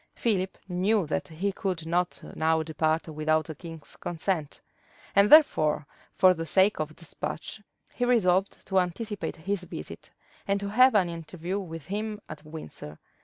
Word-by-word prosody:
Philip 190 -5 0
knew 190 +2 +2
that 150 - -2
he 180 +5 -2
could 185 -4 -3
not 175 +2 -1
now 160 0 +2
depart 160 +1 0
without 155 0 +1
the 160 - -6
king's 165 0 -10
consent; 165 -3 -2 0.6
and 200 +1 +5
therefore, 155 - +6 0.3
for 185 0 +6
the 165 -1 -5
sake 190 +5 +3
of 155 0 -3
despatch, 165 +4 -6 0.3
he 245 - -2
resolved 195 -6 +2
to 190 -1 +2
anticipate 205 +4 -3
his 180 +3 -3
visit, - - -8 0.4
and 200 0 +2
to 200 0 -4
have 255 +3 +6
an 190 -4 +4
interview 170 +3 -4
with 165 -6 -7
him 210 +3 -3
at 155 -1 -9
Windsor. 150 - -9
180 Hz, 155 wpm, -28 LUFS, 160-200 Hz, 0.6 s, therefore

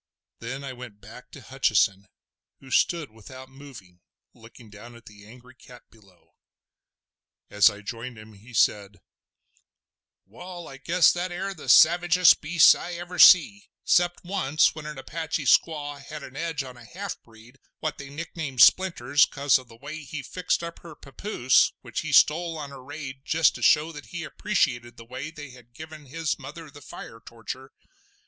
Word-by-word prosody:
Then 130 +4 -6
I 135 -1 -6
went 120 -5 -11
back 120 +5 -14
to 140 - -13
Hutcheson, 105 -6 0 0.5
who 130 - -15
stood 165 -8 +1
without 130 +4 -13
moving, 130 -10 -14 0.3
looking 115 -1 -17
down 115 +3 -13
on 115 - -16
the 105 -1 -15
angry 125 +3 -16
cat 125 -1 -16
below. 100 -5 -25 1.2
As 105 +2 +5
I 105 0 -10
joined 115 +3 -8
him, 110 0 -13
he 105 +5 -17
said: 105 -3 +1 1.3
"Wall, 175 - -11
I 135 - -11
guess 170 +6 +3
that 175 +1 -4
air 195 +3 -4
the 175 - -10
savagest 175 +2 +5
beast 165 +2 +6
I 175 - -7
ever 175 +1 -7
see—'cept 175 - +4
once 155 -5 +1
when 155 -1 -9
an 150 -2 -8
Apache 160 +1 -5
squaw 145 0 +1
had 150 +1 -9
an 130 - -11
edge 160 -2 -3
on 130 -2 -11
a 120 - -14
half 200 +8 -7
breed 115 +3 -19 0.2
what 155 -1 -5
they 140 -1 -9
nicknamed 150 -3 0
'Splinters' 145 -7 +4
"cos 140 -1 +2
of 130 - -15
the 115 - -16
way 145 +5 -8
he 145 -1 -8
fixed 180 +4 -2
up 170 0 -7
her 165 -3 -12
papoose 135 - +1
which - - -5
he - - -5
stole 165 +1 +3
on 145 -2 -7
a 135 - -11
raid 135 -1 -9
just 160 +1 +2
to - - -10
show 155 +2 +3
that 145 -2 -11
he 170 -2 -7
appreciated 120 - -2
the 115 - -12
way 130 +5 -7
they 145 -4 -11
had 120 -1 -18
given 155 -1 -11
his 160 +3 -3
mother 150 +3 -10
the 145 0 -14
fire 115 -3 -11
torture. 125 +3 -9
140 Hz, 170 wpm, -25 LUFS, 120-160 Hz, 1.3 s, beast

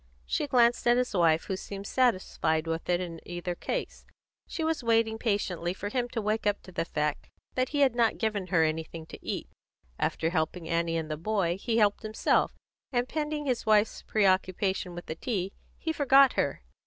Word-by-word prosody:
She - - -1
glanced 240 -2 +3
at 240 0 +5
his 250 -2 0
wife, 165 -3 +3
who 190 - -3
seemed 195 +1 -7
satisfied 185 -10 +1
with 165 +1 -3
it 175 0 +3
in 170 -2 -5
either 175 0 -4
case. - - -4 0.4
She 325 - -4
was 320 -4 0
waiting 225 -1 +2
patiently 185 -5 -1
for 205 - -4
him 245 +1 -1
to 235 -2 -3
wake 215 +1 0
up 205 - 0
to 185 - -12
the 170 - -2
fact 150 -2 -2 0.2
that 255 0 0
he 290 -1 0
had 265 -4 +5
not 235 -2 +3
yet - - -16
given 215 -4 -1
her 170 -3 +3
anything 160 +1 -2
to - - -12
eat; - - -3 0.5
after 165 +1 0
helping 160 0 -1
Annie 165 0 0
and 160 -1 -3
the 155 - -2
boy, 175 -1 0
he 230 -2 0
helped 205 -2 +3
himself, 215 -1 +1 0.4
and 245 -1 +1
pending 300 0 -2
his 250 -4 -1
wife's 215 0 +3
pre 215 -2 +1
occupation 185 -1 +1
with 175 - -7
the - - -4
tea, 195 +1 -3 0.2
he 320 - -2
forgot 275 -3 +6
her. 140 - -1
200 Hz, 200 wpm, -29 LUFS, 170-240 Hz, 0.5 s, forgot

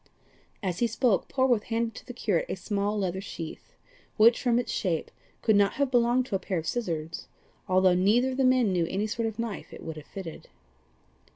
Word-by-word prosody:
As 180 -2 -2
he 235 - +3
spoke 230 -2 +1
Polwarth 255 -5 +2
handed 230 0 -1
to - - -11
the - - -5
curate 205 -8 0
a - - -1
small 205 +2 -1
leather 190 -2 -1
sheath, 165 -5 -8 0.4
which, 230 +2 +6
from 240 -2 +2
its 245 - -1
shape, 170 -6 -1 0.3
could 220 - +4
not 200 -1 +4
have 280 -2 0
belonged 245 +1 +3
to 230 - -3
a - - +1
pair 185 -2 -3
of 160 - -3
scissors, 165 -7 -3 0.4
although 185 0 +5
neither 215 +8 +3
of 255 - -5
the 270 - +2
men 255 -5 +4
knew 175 -2 +1
any 200 +3 -1
sort 225 +1 -1
of 220 -1 -5
knife 230 -3 -5
it - - -10
would 160 -1 -6
have 155 - -10
fitted. 185 -5 -8
210 Hz, 205 wpm, -28 LUFS, 185-240 Hz, 0.4 s, which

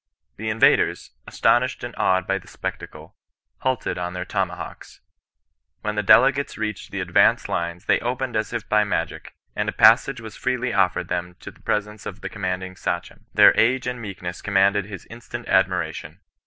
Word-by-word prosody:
The 110 +1 -3
invaders, 110 +1 +2 0.2
astonished 125 +1 +1
and 120 0 -5
awed 95 0 +2
by 95 0 0
the - - -19
spectacle, - - -7 0.4
halted 130 -7 -1
on 90 0 -3
their 90 0 -4
tomahawks. 95 -2 -5 0.8
When 105 - -2
the 105 - 0
dele 130 +6 +7
gates 140 +1 -5
reached 105 -2 -4
the - - -5
advanced - - +3
lines 85 0 -3
they - - +3
opened 125 0 -3
as 110 -1 -1
if 120 -4 -4
by 105 0 +3
magic, 85 -6 -3 0.2
and - - -1
a - - -1
passage 120 +4 +5
was 110 -2 -9
freely 125 0 -1
offered 95 -3 +1
them 90 0 -3
to - - -8
the - - -24
pre 105 - +1
sence 105 0 -11
of 100 0 -8
the 95 - -5
commanding 95 -2 -4
Sachem. - - -5
Their - - +7
age 125 +3 +2
and 125 -1 -4
meek 100 -5 -8
ness 90 0 -5
conmianded 100 0 +2
his 100 -3 -9
instant 115 +1 -9
admiration. - - 0
105 Hz, 180 wpm, -23 LUFS, 95-120 Hz, 0.8 s, dele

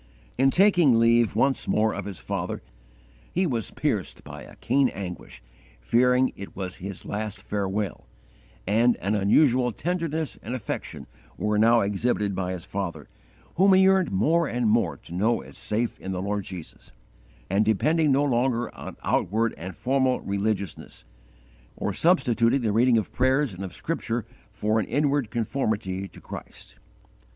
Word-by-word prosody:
In 135 +2 +4
taking 175 - +5
leave 115 -1 +3
once 135 +4 +1
more 110 0 +2
of - - -5
his 100 -3 -6
father - - -4 0.7
he 185 +2 +1
was 120 - -1
pierced - - -2
by 75 +1 -9
a - - -13
keen 135 +1 +2
anguish, 90 -10 -8 0.4
fearing 125 - +3
it 100 - -9
was 95 -2 -5
his 95 +1 -7
last 105 0 -4
farewell, 100 - -3 0.6
and 115 +5 +3
an 100 +3 -2
unusual 125 +5 +3
tenderness 160 - -3
and 120 +4 -4
affection 110 -6 -5 0.3
were 105 0 0
now 115 +1 +5
exhibited 105 0 0
by 90 -1 -2
his 90 -2 -7
father, 85 -7 -5 0.5
whom 190 +2 +6
he 190 - +6
yearned 190 -2 +4
more 155 - +2
and 120 -2 0
more 115 +1 +1
to - - -13
know 110 +6 +1
as - - -13
safe 115 +2 -2
in 95 - -5
the 90 - -3
Lord 100 -1 -2
Jesus, 90 -4 -10 0.6
and 100 +3 +2
depending 150 +9 +2
no 135 +2 +3
longer 120 -3 0
on - - -9
outward 115 +5 +1
and 90 +2 -8
formal 130 -1 +1
religiousness, 100 - -3 0.7
or 100 - -2
substituting 125 - +3
the 110 -3 0
reading 120 +3 +4
of 110 - -2
prayers 130 -1 +2
and 90 +2 -7
of 95 - -6
Scripture 120 -8 -3 0.3
for 105 +2 0
an 105 - -2
inward 145 -4 +1
conformity 110 -5 -2
to - - -15
Christ. - - -11
115 Hz, 155 wpm, -25 LUFS, 100-130 Hz, 0.7 s, whom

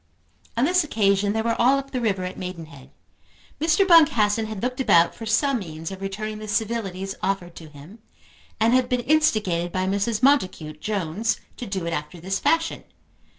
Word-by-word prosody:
On 240 - +3
this 360 +2 +3
occasion 205 -6 +1
they 220 0 -1
were 230 0 0
all 260 +3 +5
up 275 0 -6
the 255 - -2
river 195 -5 0
at 185 +1 -5
Maidenhead. 165 -7 -8 0.7
Mr. 325 +5 +2
Boncassen 225 - +4
had 215 -2 -7
looked 250 +1 -2
about 170 -9 +4
for 225 - -8
some 265 +4 +2
means 165 -2 -7
of 190 0 -8
returning 215 +2 -5
the 215 - -8
civilities 205 -3 -2
offered 185 -2 -2
to 160 -2 -11
him, 150 +9 -14 0.6
and 225 +2 +3
had 255 -1 +2
been 250 -2 0
instigated 215 - +1
by 185 +1 -1
Mrs. 200 +4 -1
Montacute 185 - +1
Jones 205 +1 -2 0.2
to 245 - -7
do 190 -3 -3
it 170 - -2
after 150 +3 -5
this 190 +3 -2
fashion. 325 0 0
210 Hz, 180 wpm, -23 LUFS, 185-245 Hz, 0.7 s, all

